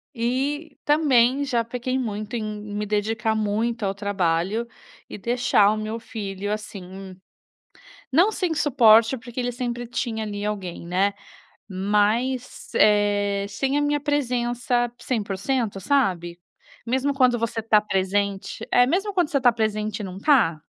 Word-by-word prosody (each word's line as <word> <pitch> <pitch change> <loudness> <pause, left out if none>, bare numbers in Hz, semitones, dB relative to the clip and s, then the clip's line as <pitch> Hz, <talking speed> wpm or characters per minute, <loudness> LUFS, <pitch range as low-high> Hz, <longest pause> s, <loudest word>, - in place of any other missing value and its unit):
E, 275 +6 -2
também 280 -3 +3
já 245 -4 0
pequei 250 +2 -3
muito 215 -3 -4
em 225 - -2
me 210 0 -5
dedicar 215 +2 0
muito 220 +2 -1
ao 195 -1 -1
trabalho, 195 +2 -1 0.4
e - - -7
deixar 215 -2 +3
o 215 - -1
meu 215 +1 -4
filho, 205 -2 -5
assim, 190 -3 -8 0.9
não 345 +10 +5
sem 360 -6 -1
suporte, 240 -5 +5
porque 240 +1 -6
ele 245 0 -1
sempre 245 -1 -4
tinha, 235 -2 -3
ali, 205 -1 -4
alguém, 195 -5 -4
né, 190 +3 +1 0.6
mas, 210 +7 0
eh, 205 -1 +3
sem 270 +7 -1
a - - +1
minha 290 0 +1
presença 245 -4 0
100%, 215 0 -2
sabe, 185 -7 0 0.5
mesmo 265 +4 0
quando 255 -3 +3
você 230 0 -2
tá 215 -1 +4
presente. 200 0 -2
É, 245 - +6
mesmo 390 +10 0
quando 355 -5 +2
você 280 - +1
está 250 -2 +4
presente 215 -1 -2
e - - -2
não 190 -1 -7
tá? 200 - +3
225 Hz, 140 wpm, -24 LUFS, 205-255 Hz, 0.9 s, É